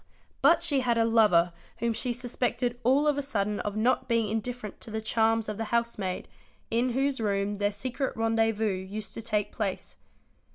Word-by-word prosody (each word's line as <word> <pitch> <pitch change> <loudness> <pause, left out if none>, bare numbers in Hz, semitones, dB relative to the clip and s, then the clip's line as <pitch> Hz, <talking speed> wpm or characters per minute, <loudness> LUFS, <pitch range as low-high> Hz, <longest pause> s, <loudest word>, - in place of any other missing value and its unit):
But 335 0 +5
she 295 -5 +3
had 240 -2 +1
a 225 - +4
lover 210 -7 +4 0.2
whom 235 -1 0
she 245 +3 -1
suspected 245 0 -2
all 265 +5 +4
of 295 -1 +2
a - - +1
sudden 210 -7 -1
of 205 0 -3
not 245 +5 +2
being 230 -2 +2
indifferent 225 0 -4
to - - -10
the 220 0 -3
charms 225 0 +1
of 210 - -4
the 225 - -2
housemaid, 225 -5 -1 0.4
in 240 +2 +1
whose 270 -1 0
room 200 -1 0
their 205 0 +1
secret 255 +6 -3
rendez 225 -1 +2
vous 205 -4 0
used 210 +3 -6
to - - -5
take 210 -2 -1
place. 200 -4 -4
225 Hz, 190 wpm, -28 LUFS, 210-245 Hz, 0.4 s, But